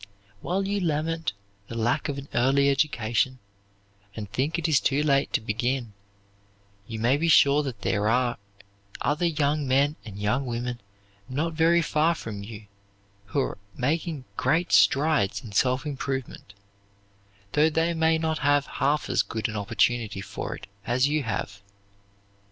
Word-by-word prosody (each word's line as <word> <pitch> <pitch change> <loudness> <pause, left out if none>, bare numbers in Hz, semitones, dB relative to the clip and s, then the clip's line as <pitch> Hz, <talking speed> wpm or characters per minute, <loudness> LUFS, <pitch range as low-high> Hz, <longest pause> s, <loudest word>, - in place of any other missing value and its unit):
While 195 +2 -1
you 200 0 0
lament 160 - -1 0.3
the 115 - -7
lack 120 +7 0
of 140 - -3
an 140 0 -7
early 140 +3 +3
education 130 -3 0 0.8
and 105 -2 -5
think 145 +9 -1
it 170 - -3
too 145 -2 +2
late 140 -2 +2
to - - +3
begin, 115 +1 -2 0.9
you 115 - -5
may 120 +5 +2
be 165 +3 0
sure 145 -2 +6
that 135 -5 -6
there 105 -1 +1
are 120 -1 +1 0.6
other 155 +4 +1
young 150 -2 0
men 140 +3 +2
and 105 -3 -9
young 125 +7 0
women 120 0 -3 0.5
not 155 +6 -1
very 165 +2 +3
far 160 +2 +2
from 105 -8 -6
you 105 +1 -9 0.6
who 110 +8 0
are 130 - -3 0.2
making 150 +1 -1
great 160 +7 +1
strides 135 -9 +3
in 110 - -9
self 130 +6 +1
improvement, 135 -7 -5 1.0
though 150 +2 +4
they 165 +2 +1
may 160 0 +3
not 160 -1 -1
have 145 0 +3 0.2
half 145 +2 +2
as 130 - +2
good 110 +1 -3
an 110 - -6
opportunity 105 +1 0
for 95 - -5
it - - -11 0.2
as 125 +4 +2
you 150 +1 +1
have. 100 -4 -4
135 Hz, 150 wpm, -26 LUFS, 115-155 Hz, 1.0 s, sure